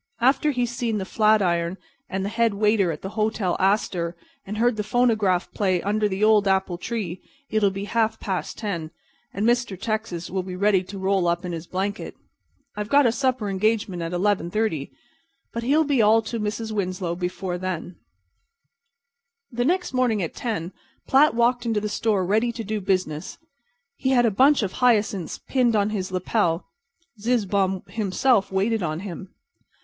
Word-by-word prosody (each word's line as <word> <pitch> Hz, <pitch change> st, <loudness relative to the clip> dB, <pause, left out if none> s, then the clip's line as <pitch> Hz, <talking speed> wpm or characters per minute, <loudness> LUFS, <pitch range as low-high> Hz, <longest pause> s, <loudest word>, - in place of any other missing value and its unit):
After 265 Hz, +5 st, +3 dB
he's 245 Hz, -4 st, 0 dB
seen 235 Hz, -2 st, -1 dB
the 190 Hz, -, -3 dB
Flatiron 190 Hz, -5 st, +2 dB, 0.3 s
and 190 Hz, 0 st, -2 dB
the -, -, -1 dB
head 225 Hz, -1 st, +1 dB
waiter 210 Hz, -3 st, +2 dB
at 150 Hz, -, -7 dB
the 190 Hz, -, -4 dB
Hotel 215 Hz, -3 st, 0 dB
Astor 185 Hz, -3 st, +1 dB, 0.3 s
and 210 Hz, +2 st, -4 dB
heard 240 Hz, +1 st, +2 dB
the 210 Hz, -, -1 dB
phonograph 215 Hz, -5 st, +1 dB
play 190 Hz, -3 st, +1 dB
'Under 210 Hz, +1 st, +1 dB
the 195 Hz, +2 st, -2 dB
Old 215 Hz, -2 st, +5 dB
Apple 190 Hz, -2 st, +1 dB
Tree' 190 Hz, -5 st, -4 dB, 0.3 s
it'll 215 Hz, -2 st, +3 dB
be 195 Hz, +1 st, -5 dB
half 225 Hz, +2 st, 0 dB
past 190 Hz, -3 st, -3 dB
ten, 175 Hz, -8 st, -3 dB, 0.4 s
and 200 Hz, +3 st, -2 dB
Mr. 240 Hz, -5 st, +1 dB
Texas 215 Hz, -6 st, -3 dB
will 190 Hz, 0 st, -1 dB
be 180 Hz, 0 st, -7 dB
ready 200 Hz, 0 st, +3 dB
to 195 Hz, +2 st, -8 dB
roll 190 Hz, -1 st, +1 dB
up 170 Hz, +1 st, 0 dB
in 180 Hz, -, -3 dB
his 165 Hz, 0 st, -6 dB
blanket. 200 Hz, +3 st, -3 dB, 0.6 s
I've 210 Hz, 0 st, -4 dB
got 285 Hz, +1 st, +5 dB
a 235 Hz, -, +4 dB
supper 255 Hz, -3 st, 0 dB
engagement 200 Hz, -2 st, 0 dB
at 165 Hz, 0 st, -3 dB
11:30, 185 Hz, -3 st, 0 dB, 0.6 s
but 235 Hz, -, -3 dB
he'll 285 Hz, +7 st, +3 dB
be 280 Hz, -5 st, +2 dB
all 220 Hz, +1 st, +5 dB
to 230 Hz, +1 st, -4 dB
the 210 Hz, -, -1 dB
Mrs. 220 Hz, +1 st, -5 dB
Winslow 185 Hz, -4 st, -2 dB
before 180 Hz, 0 st, -3 dB
then." 180 Hz, -1 st, -4 dB, 1.5 s
The 245 Hz, 0 st, -1 dB
next 360 Hz, 0 st, 0 dB
morning 240 Hz, -6 st, +1 dB
at 165 Hz, -, -4 dB
10 195 Hz, -7 st, -4 dB, 0.3 s
Platt 275 Hz, -1 st, +4 dB
walked 240 Hz, +1 st, +2 dB
into 225 Hz, -3 st, 0 dB
the 210 Hz, -, -3 dB
store 210 Hz, -2 st, 0 dB
ready 220 Hz, +5 st, +2 dB
to 230 Hz, -1 st, -5 dB
do 215 Hz, 0 st, -3 dB
business. 185 Hz, -5 st, -2 dB, 0.6 s
He 260 Hz, -, -1 dB
had 245 Hz, -2 st, +4 dB
a 225 Hz, -, +3 dB
bunch 265 Hz, +5 st, +4 dB
of 190 Hz, -, -2 dB
hyacinths 215 Hz, -7 st, +2 dB
pinned 245 Hz, -4 st, +1 dB
on 205 Hz, 0 st, +2 dB
his 190 Hz, -3 st, -3 dB
lapel. 185 Hz, -2 st, 0 dB, 0.5 s
Zizzbaum 200 Hz, -5 st, 0 dB
himself 210 Hz, +3 st, +1 dB
waited 205 Hz, +3 st, +1 dB
on 155 Hz, -1 st, -2 dB
him. 190 Hz, -1 st, -8 dB
205 Hz, 175 wpm, -24 LUFS, 185-230 Hz, 1.5 s, Old